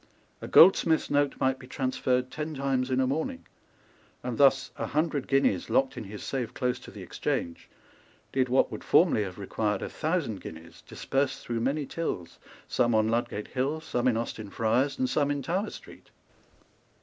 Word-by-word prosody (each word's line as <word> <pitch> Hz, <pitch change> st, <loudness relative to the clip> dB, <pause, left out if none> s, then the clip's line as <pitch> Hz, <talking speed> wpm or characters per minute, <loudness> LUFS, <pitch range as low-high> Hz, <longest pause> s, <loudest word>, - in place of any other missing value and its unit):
A -, -, -6 dB
goldsmith's 165 Hz, -3 st, +6 dB
note 145 Hz, -1 st, +1 dB
might 130 Hz, 0 st, +1 dB
be 125 Hz, -, -12 dB
transferred 130 Hz, -1 st, -1 dB
ten 155 Hz, +1 st, -4 dB
times 135 Hz, -2 st, 0 dB
in 130 Hz, 0 st, +1 dB
a 130 Hz, -, +3 dB
morning; 130 Hz, -, -2 dB, 0.8 s
and 125 Hz, -2 st, -4 dB
thus 135 Hz, -1 st, +4 dB
a -, -, -3 dB
hundred 150 Hz, -3 st, -1 dB
guineas, 140 Hz, -, +2 dB
locked 265 Hz, -1 st, +2 dB
in -, -, -6 dB
his 105 Hz, +1 st, -8 dB
safe 125 Hz, -4 st, -3 dB
close 125 Hz, -2 st, -1 dB
to -, -, -12 dB
the 100 Hz, -, -10 dB
Exchange, 85 Hz, -1 st, -3 dB, 0.6 s
did 130 Hz, -1 st, +1 dB
what 130 Hz, -, +3 dB
would -, -, -6 dB
formerly -, -, +4 dB
have 95 Hz, -3 st, -5 dB
required 105 Hz, +1 st, -2 dB
a -, -, -4 dB
thousand 155 Hz, -, -2 dB
guineas, 80 Hz, +1 st, -10 dB
dispersed 135 Hz, 0 st, -2 dB
through 120 Hz, -1 st, -2 dB
many 140 Hz, +5 st, 0 dB
tills, 95 Hz, -, -4 dB, 0.3 s
some 120 Hz, -2 st, +2 dB
on 110 Hz, 0 st, +3 dB
Ludgate 115 Hz, -2 st, -2 dB
Hill, 140 Hz, +5 st, -1 dB
some 130 Hz, -6 st, -1 dB
in 120 Hz, -3 st, +3 dB
Austin 110 Hz, -2 st, -4 dB
Friars, 120 Hz, -, +1 dB
and 260 Hz, 0 st, +1 dB
some 145 Hz, -, +1 dB
in 145 Hz, -1 st, -1 dB
Tower 190 Hz, +9 st, -1 dB
Street. -, -, -13 dB
130 Hz, 175 wpm, -28 LUFS, 115-145 Hz, 0.8 s, goldsmith's